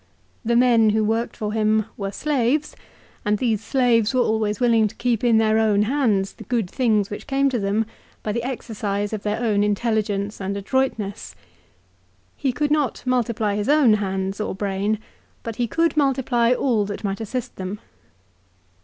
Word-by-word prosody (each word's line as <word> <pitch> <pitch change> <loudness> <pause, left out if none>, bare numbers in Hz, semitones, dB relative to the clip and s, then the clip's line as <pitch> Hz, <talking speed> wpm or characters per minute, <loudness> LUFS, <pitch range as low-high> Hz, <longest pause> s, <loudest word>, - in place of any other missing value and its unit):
The 235 +1 +1
men 235 -3 +5
who 215 +1 +2
worked 225 +2 -1
for 210 -2 -3
him 215 -1 +2
were 200 -1 -4
slaves, 285 +2 0 0.5
and 210 0 +1
these 220 -2 0
slaves 245 -2 +2
were 255 - +4
always 220 -2 0
willing 230 -3 +4
to - - -10
keep 240 -2 -1
in 235 -2 +4
their 220 0 +3
own 210 -2 +3
hands 215 -6 +1
the - - -11
good 230 -3 0
things 215 -2 +1
which 205 - -7
came 275 -1 +2
to 245 - 0
them 205 +2 0 0.4
by 215 - -2
the 235 +3 -1
exercise 210 -5 -3
of 215 - -3
their 210 +1 -2
own 215 -4 +1
intelligence 210 -1 -1
and 195 +1 -3
adroitness. 210 -2 -2 1.0
He 270 - -1
could 290 +4 -1
not 295 -5 0
multiply 235 -4 0
his 205 +3 -2
own 290 -7 +5
hands 195 -1 -2
or 210 - -3
brain, 200 +2 -1 0.5
but 230 -2 -6
he 240 - 0
could 330 +7 +1
multiply 260 -5 +2
all 245 -4 +2
that 205 +1 -6
might 200 +1 -2
assist 240 +3 -5
them. 190 +2 -5
220 Hz, 170 wpm, -22 LUFS, 205-245 Hz, 1.0 s, men